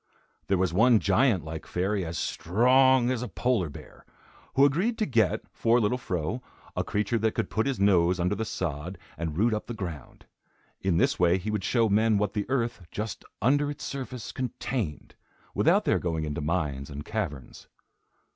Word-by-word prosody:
There 95 - +2
was 90 -2 0
one 115 +5 +5
giant 100 - +2
like 80 0 -7
fairy 95 +2 -1
as 85 -1 -4
strong 125 - +3
as 125 -2 -1
a 125 - -3
polar 95 0 0
bear, 70 - -13 0.5
who 135 - +6
agreed 185 - +1
to 215 - +1
get, 115 - +2
for 115 +1 +3
little 120 +3 +1
Fro, 95 +3 -3 0.3
a - - 0
creature 105 +3 -1
that 110 0 0
could - - -2
put 110 +4 0
his 135 -5 -1
nose 90 -2 +3
under 90 +3 +1
the 105 +2 -2
sod 90 -3 -4 0.2
and 80 -1 -4
root 110 +4 +3
up 105 - -3
the 120 - -5
ground. 85 - -7 0.6
In 95 -3 +1
this - - +2
way 90 0 +4
he 100 +4 -4
would 105 -3 -2
show 115 +1 +2
men 110 +1 +3
what 105 -1 0
the 105 +1 -3
earth, 120 -6 -1
just 110 0 -5 0.2
under 145 +4 +3
its 145 0 -6
surface, 130 -3 -5
contained, 120 - -4 0.4
without - - +3
their - - +2
going 80 -3 -2
into 75 -1 -3
mines 75 -4 -2
and 75 0 -7
caverns. 85 - -5
105 Hz, 185 wpm, -27 LUFS, 85-120 Hz, 0.6 s, who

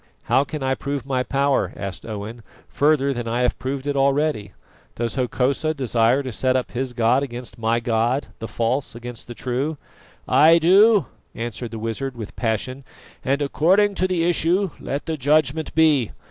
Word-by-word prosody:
"How 135 - +3
can 150 0 -6
I 130 0 +1
prove 140 -1 -4
my 130 -2 0
power," 140 +1 0
asked 100 +1 -6
Owen, 110 +2 -6 0.3
"further 140 -2 +2
than 120 -2 -5
I 120 +2 -1
have 125 - 0
proved 135 +1 -4
it 145 -1 -1
already? 140 -6 +1 0.4
Does 115 0 -2
Hokosa 135 +4 0
desire 125 0 +2
to 130 - -5
set 130 +3 0
up 130 - -1
his 125 0 -3
god 120 +3 +2
against 125 -3 -7
my 115 +1 +1
God 115 +3 0
the 115 - -5
false 120 +4 -2
against 120 0 -9
the 120 - -8
true?" 135 +6 -2 0.5
"I 160 +3 +6
do," 195 +5 +5 0.3
answered 120 +1 -5
the 115 - -7
wizard 115 +4 -4
with 110 -3 -8
passion, 125 +4 -2 0.4
"and 140 +2 0
according 190 +8 +3
to 185 -1 0
the 180 -3 0
issue 175 +2 +2
let 140 +2 -4
the 160 -1 -3
judgment 150 +2 +1
be. 150 -8 +4
130 Hz, 175 wpm, -22 LUFS, 120-150 Hz, 0.5 s, I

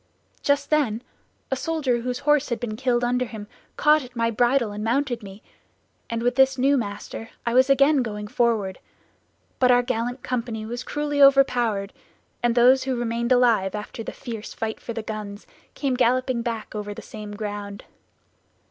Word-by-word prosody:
Just 285 +1 +1
then 250 -7 +1 0.5
a - - +2
soldier 265 -3 0
whose 250 +1 -2
horse 295 -1 +3
had 235 - -2
been 230 -3 -4
killed 245 0 0
under 250 +1 +1
him 220 -3 -8 0.3
caught 300 0 +4
at 250 0 -13
my 230 0 +1
bridle 240 0 +2
and 210 +1 -5
mounted 240 +1 0
me, 200 0 -11 0.7
and 230 0 -2
with 245 +1 +1
this 265 0 +4
new 275 +3 +3
master 225 -1 -4 0.2
I 235 - 0
was 260 +2 +5
again 275 +1 +5
going 210 -3 -4
forward; 215 -5 0 0.8
but 255 - +4
our 245 0 +5
gallant 245 +1 -2
company 235 -3 -3
was 240 +2 -5
cruelly 290 +1 -2
overpowered, 245 -7 +4 0.5
and 240 -1 +1
those 255 +2 +5
who 265 -1 0
remained 235 0 -2
alive 230 -6 +3
after 210 +2 -6
the - - -5
fierce 230 -5 -7
fight 220 -1 -3
for 235 - -6
the 225 -1 -4
guns 210 -1 -6 0.3
came 275 -3 -1
galloping 255 0 +1
back 230 -2 -4
over 205 -1 -5
the - - -9
same 210 -1 -8
ground. 205 -1 -6
240 Hz, 175 wpm, -24 LUFS, 220-260 Hz, 0.8 s, was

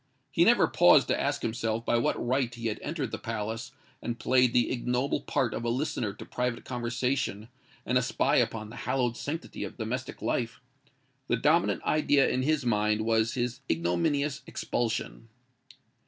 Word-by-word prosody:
He - - +4
never - - +5
paused - - +5
to - - +1
ask - - -1
himself 115 0 -2
by 120 - +2
what - - +1
right 130 -1 +1
he 115 -1 -2
had 105 - -4
entered 145 -7 -3
the 110 - -4
palace 110 0 -4 0.3
and 120 0 -3
played 125 +1 +3
the 120 -1 +2
ignoble 125 +2 0
part 120 -5 0
of 115 - -4
a 120 - 0
listener 120 -4 -1
to 100 - -10
private 125 -1 -3
conversation 125 -3 -2 0.4
and 125 +1 +3
a - - 0
spy 125 - +1
upon 110 -2 0
the - - -10
hallowed 125 -3 +1
sanctity 160 +6 -5
of - - -7
domestic 120 +3 -4
life:—the 115 -2 -4
dominant - - +2
idea 145 -2 +3
in 130 - 0
his 150 0 +1
mind 105 -2 +2
was 110 0 +1
his 125 0 -2
ignominious 90 - 0
expulsion. 115 -1 -3
120 Hz, 165 wpm, -29 LUFS, 110-130 Hz, 0.4 s, never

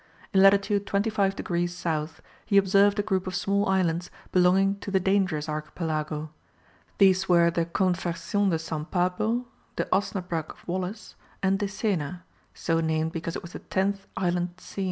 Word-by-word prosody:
In 190 - +5
latitude 200 +1 +4
25 200 -1 +1
degrees 175 -1 -2
south 160 -2 -3 0.2
he 200 - +3
observed 200 +1 +4
a 205 - +1
group 190 -2 -1
of 185 - -3
small 200 +2 +1
islands 180 -2 +1 0.2
belonging 190 +2 +3
to 200 - -6
the 195 -1 +2
Dangerous 185 -5 +1
archipelago. 155 0 -3 0.7
These 190 -1 +4
were 170 -1 +5
the 170 0 0
Convercion 180 +2 0
de 165 - +1
San 160 -1 -4
Pablo, 185 +8 0 0.3
the - - -1
Osnabrugh 180 -4 -1
of - - -13
Wallis, 185 +4 -4 0.3
and 195 0 +2
Decena, 190 -5 -2 0.3
so 165 -1 0
named 160 0 0
because 165 0 -4
it - - -5
was 170 - -10
the - - -6
tenth 195 +1 -1
island 175 -1 0
seen. 180 - -10
185 Hz, 155 wpm, -26 LUFS, 165-195 Hz, 0.7 s, In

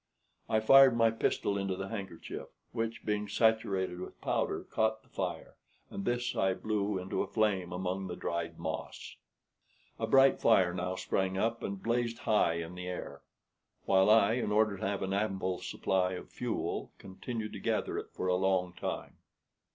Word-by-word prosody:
I 110 - +3
fired 135 +1 +7
my 115 -1 +5
pistol 100 -2 0
into 95 -1 -1
the 95 +1 -5
handkerchief, 95 -6 -6 0.2
which, 115 -1 -3
being 105 -1 -1
saturated 100 -5 +1
with 90 - -8
powder, - - -1
caught 110 0 0
the - - -27
fire, 90 -4 -4 0.3
and 100 - -5
this 120 0 -1
I 95 -1 +2
blew 105 0 -1
into 95 +1 -2
a - - -2
flame 100 -5 0
among 95 +1 -3
the 90 - -5
dried 85 -1 -3
moss. - - -5 0.8
A 115 - -1
bright 135 +3 +5
fire 95 -6 +4
now 90 +1 -2
sprang 95 +1 -1
up 115 +3 0
and 100 -1 -5
blazed 115 0 0
high 105 -7 +2
in 85 +1 -5
the 90 0 -6
air; 90 - -6 0.6
while 95 +1 +4
I, 110 -1 +6
in 120 -3 -1
order 105 -1 +3
to 95 - -2
have 100 -1 -2
an 95 0 -2
ample 95 -3 -1
supply 95 -1 0
of 90 - -8
fuel, - - -3
continued 105 +3 -6
to - - -6
gather - - -1
it - - -8
for - - -5
a 90 - +2
long 90 -1 +1
time. 90 - -5
100 Hz, 175 wpm, -31 LUFS, 95-110 Hz, 0.8 s, fired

